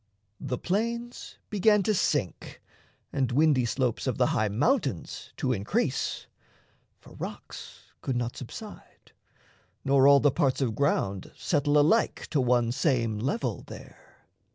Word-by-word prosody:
The 125 - -3
plains 235 - -3
began 210 0 +3
to 215 - +1
sink, 145 - -1 0.5
and 130 -2 0
windy 140 -2 +3
slopes 125 +1 -1
Of 125 - -1
the 125 - +3
high 110 -3 +1
mountains 125 - -1
to 130 -1 0
increase; 100 -2 -1 0.7
for - - -16
rocks - - -9
Could 130 - -2
not 120 0 -2
subside, 205 - -11 0.7
nor 135 0 +5
all 140 0 +7
the 145 +1 +3
parts 130 0 +1
of 125 -5 0
ground 100 -8 -1
Settle 145 -2 +1
alike 150 +2 +2
to 145 - +2
one 120 -2 +2
same 120 -5 0
level 140 - -2
there. - - -14
135 Hz, 130 wpm, -27 LUFS, 120-155 Hz, 0.7 s, all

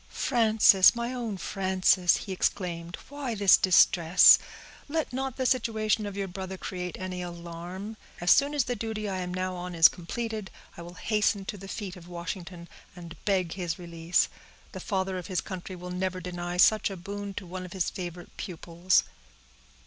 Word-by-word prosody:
"Frances—my 225 0 +4
own 230 -5 -4
Frances!" 185 -1 +2
he 195 - -7
exclaimed, 175 -2 -2
"why 280 -5 -4
this 200 -2 +6
distress? 175 -1 +6 0.5
Let 315 -3 -2
not 265 0 -3
the 260 - -1
situation 220 -4 +1
of 200 -1 -7
your 200 -1 -2
brother 190 +1 -6
create 180 -2 -5
any 185 -1 -4
alarm. 175 +4 -7 0.2
As 175 0 +3
soon 285 +1 +4
as 285 - +3
the 245 0 -3
duty 220 -1 -4
I 190 -2 -3
am 180 -1 -4
now 185 0 -2
on 180 0 -6
is 165 0 +9
completed, 215 +3 -5 0.3
I - - -9
will 175 +1 -10
hasten 210 0 0
to 205 - -5
the 195 0 -10
feet 195 -2 -6
of 175 -2 -13
Washington, 175 0 -7 0.3
and 170 -2 -10
beg 185 -5 +1
his 175 -4 -3
release. 170 -1 0 0.4
The - - -7
Father 190 -2 -2
of 175 - -8
his 185 -3 -1
Country 185 -1 -7
will 180 0 -8
never 185 0 -2
deny 175 0 -5
such 215 +4 +5
a 195 - -7
boon 200 +2 -6
to 205 - -6
one 185 +1 -6
of 180 - -9
his 190 -2 -1
favorite 175 -2 -8
pupils." 175 0 0
185 Hz, 175 wpm, -28 LUFS, 175-210 Hz, 0.5 s, is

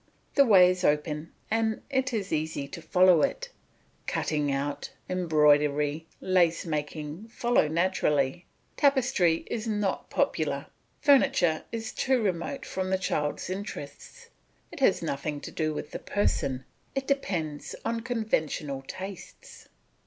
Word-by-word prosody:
The 280 - +6
way 185 -6 +7
is 185 - -4
open 150 +1 0 0.2
and 225 0 0
it 265 -1 +1
is 205 -6 -2
easy 155 -2 -2
to 170 - -8
follow 180 -1 +5
it; - - -1 0.6
cutting 150 -2 0
out, 140 +1 -2 0.2
embroidery, 150 -3 +2
lace 175 -3 +2
making 150 +4 -4
follow 240 -6 +2
naturally. 160 -2 +1 0.3
Tapestry 245 - +3
is 225 0 -4
not 210 -3 -1
popular; - - 0 0.4
furniture 270 - +4
is 225 0 -4
too 260 -1 +2
remote 195 +4 -2
from 185 0 -3
the 190 - +2
child's 150 -5 -2
interests, 185 -7 -7 0.4
it - - -9
has - - +3
nothing 145 +1 -3
to - - -7
do 155 -1 -1
with 150 0 -6
the - - -5
person, 135 -10 -1 0.3
it 270 0 -1
depends 170 - -2
on 230 0 0
conventional 185 - -2
tastes. 190 -1 -9
175 Hz, 130 wpm, -28 LUFS, 150-220 Hz, 0.6 s, way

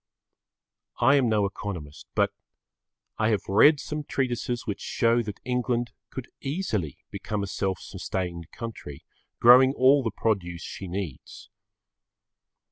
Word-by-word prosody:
I 125 +3 +5
am 130 -4 +3
no 105 -2 +2
economist, 90 -7 -6
but - - +3 0.9
I 110 0 +3
have 105 -5 +1
read 140 +10 +6
some 150 +2 -4
treatises 125 -3 -2
which 105 - -3
show 115 +1 +2
that 105 -3 -6
England 125 -1 0 0.2
could 130 -2 -7
easily 135 - -2
become 105 -2 -3
a - - -1
self 95 -1 -1
sustained 85 -4 -5
country, 110 - -8 0.4
growing 130 +3 +8
all 135 +2 +5
the 115 - -1
produce 95 -5 -1
she 95 - -7
needs. 90 -6 -6
110 Hz, 125 wpm, -26 LUFS, 95-125 Hz, 0.9 s, growing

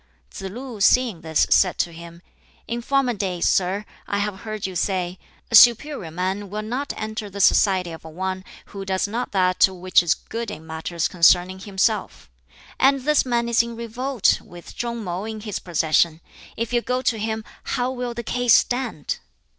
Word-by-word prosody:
Tsz 195 -1 -6
lu 240 0 -8
(seeing 230 -4 +3
this) 160 -1 +2
said 185 -2 +4
to 175 - 0
him, 170 +1 -12 0.4
"In 235 +1 -3
former 270 0 +1
days, 185 -5 -1
sir, 195 +3 +1 0.2
I 200 - -1
have 205 -1 -2
heard 215 -2 -5
you 190 -1 -5
say, 180 0 -1 0.3
'A - - -6
superior 240 - +6
man 190 +4 -3
will 210 +2 -4
not 255 +6 -3
enter 215 -1 -4
the 200 +1 -8
society 185 -2 +3
of 165 - -10
one 185 +4 -4 0.3
who 195 -1 -5
does 190 +1 -1
not 235 +4 -3
that 185 -1 +4
which 185 -1 +2
is 175 -1 +2
good 230 -1 -6
in 160 -6 -8
matters 160 +1 -2
concerning 180 +1 +4
himself'; 190 - -1 0.5
and 270 0 +4
this 300 0 +2
man 235 -1 +1
is 235 0 +4
in 235 0 -6
revolt, 235 +1 0
with 175 0 -13
Chung 235 -1 -3
man 185 +2 -4
in 220 -1 -5
his 210 -2 -4
possession; 160 -1 +1 0.4
if 230 +1 -3
you 240 - +3
go 250 +1 -2
to 225 -4 +1
him, 220 0 -2 0.2
how 250 0 -1
will 245 -2 -4
the 235 - -4
case 245 0 +3
stand?" 245 - -1
205 Hz, 180 wpm, -23 LUFS, 180-235 Hz, 0.5 s, superior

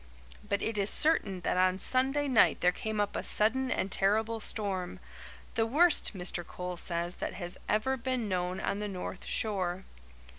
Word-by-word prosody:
But 200 -1 -2
it 225 -2 -1
is 200 +1 +2
certain 210 - +2
that 180 - 0
on 185 0 +3
Sunday 270 +7 +1
night 255 -6 +4
there 180 - +4
came 215 +3 -4
up 205 0 0
a - - -1
sudden 255 +5 +1
and 195 - -1
terrible 220 +4 +1
storm 195 -5 -2 0.5
the 225 0 +1
worst, 315 +5 +3
Mr. 180 -1 -2
Coles 180 +1 -5
says, 170 0 -2
that - - -2
has 175 -1 -2
ever 240 +6 +1
been 250 -2 -2
known 180 -1 -1
on 200 - -2
the 210 - -3
north 185 -1 -6
shore. 190 -4 -1
205 Hz, 175 wpm, -30 LUFS, 180-230 Hz, 0.5 s, night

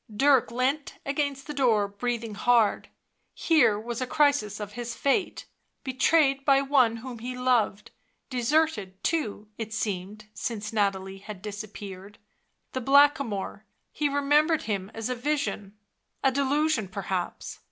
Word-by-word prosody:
Dirk 270 +4 +4
leant 260 +5 -1
against 280 -1 -2
the 295 - -6
door, 230 -7 +2
breathing 230 +2 -3
hard. 230 0 +2 0.5
Here 290 -11 +3
was 235 +2 -5
a 255 - -1
crisis 285 -9 +2
of 205 -1 -6
his 235 +1 -5
fate; 320 +8 0 0.4
betrayed 275 +1 +2
by 275 -1 +5
one 270 -4 +3
whom, 245 0 -8
he 250 +2 -5
loved, 245 -5 +1 0.4
deserted, 245 -7 0
too, 215 -10 -1
it 220 -1 -4
seemed, 210 0 -4
since 210 0 -4
Nathalie 195 -2 -1
had 200 -1 -10
disappeared... 205 -1 -8 0.5
the 260 - -3
Blackamoor... 270 -7 +3 0.3
he 295 -1 0
remembered 295 +3 +2
him 200 -3 -3
as 225 -1 -3
a 255 - -1
vision... 250 -6 -2 0.5
a 270 - +4
delusion 280 -3 +1
perhaps. 190 -1 -4
240 Hz, 130 wpm, -27 LUFS, 210-280 Hz, 0.5 s, by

